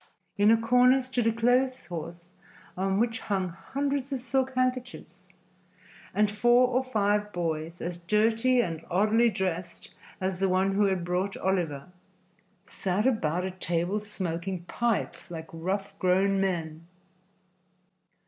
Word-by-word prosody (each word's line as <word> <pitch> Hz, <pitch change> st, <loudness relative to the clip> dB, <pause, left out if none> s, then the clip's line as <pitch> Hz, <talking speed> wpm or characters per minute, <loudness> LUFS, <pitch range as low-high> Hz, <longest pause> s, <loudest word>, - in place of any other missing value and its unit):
In 205 Hz, +1 st, +4 dB
a 225 Hz, -, +6 dB
corner 250 Hz, +3 st, +4 dB
stood 255 Hz, -2 st, -1 dB
a -, -, +4 dB
clothes 250 Hz, +3 st, +1 dB
horse 170 Hz, +1 st, -7 dB, 0.5 s
on 195 Hz, +1 st, 0 dB
which 230 Hz, 0 st, 0 dB
hung 190 Hz, -3 st, -1 dB
hundreds 275 Hz, -, -3 dB
of 270 Hz, -, -1 dB
silk 260 Hz, +1 st, -1 dB
handkerchiefs, 255 Hz, -1 st, -3 dB, 0.8 s
and 210 Hz, -1 st, +2 dB
four 240 Hz, +4 st, +4 dB
or 255 Hz, +1 st, +1 dB
five 210 Hz, -4 st, 0 dB
boys, 165 Hz, -1 st, -3 dB
as 175 Hz, +1 st, -3 dB
dirty 225 Hz, +7 st, +2 dB
and 165 Hz, -7 st, -4 dB
oddly 215 Hz, +6 st, +3 dB
dressed 180 Hz, -3 st, -4 dB, 0.3 s
as 185 Hz, -1 st, -2 dB
the 195 Hz, 0 st, +2 dB
one 190 Hz, +1 st, +2 dB
who 205 Hz, +1 st, +3 dB
had 190 Hz, -3 st, 0 dB
brought 180 Hz, +3 st, -1 dB
Oliver, 170 Hz, -7 st, -1 dB, 0.8 s
sat 195 Hz, +3 st, -2 dB
about 180 Hz, -8 st, +1 dB
a 190 Hz, -, -3 dB
table 180 Hz, +2 st, -1 dB
smoking 185 Hz, -3 st, -4 dB
pipes 230 Hz, +3 st, -2 dB
like 160 Hz, -2 st, -7 dB
rough, 195 Hz, +4 st, -3 dB
grown 195 Hz, +2 st, +2 dB
men. 165 Hz, -4 st, -3 dB
195 Hz, 135 wpm, -28 LUFS, 175-235 Hz, 0.8 s, a